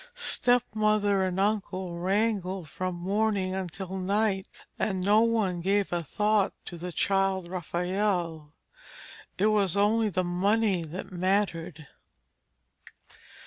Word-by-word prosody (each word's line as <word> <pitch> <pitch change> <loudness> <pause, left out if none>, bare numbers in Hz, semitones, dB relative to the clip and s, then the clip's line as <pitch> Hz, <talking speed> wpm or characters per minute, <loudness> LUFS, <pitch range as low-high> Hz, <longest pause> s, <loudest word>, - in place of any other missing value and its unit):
Stepmother 215 - +2
and 185 0 -1
uncle 190 -4 -1
wrangled 190 -2 0
from 185 +4 -4
morning 195 +1 0
until 190 0 -5
night, 195 0 -1 0.2
and 190 -3 0
no 205 +4 +4
one 215 -6 +1
gave 195 +1 +1
a 175 - 0
thought 210 +5 +1
to 175 - -7
the 175 +1 -6
child 195 0 +1
Raphael. 175 -3 -2 0.8
It 200 - +2
was 205 -4 +2
only 215 +2 +3
the 185 -1 0
money 195 +2 +1
that 165 +5 -7
mattered. 180 -4 -1
190 Hz, 110 wpm, -28 LUFS, 180-210 Hz, 0.8 s, no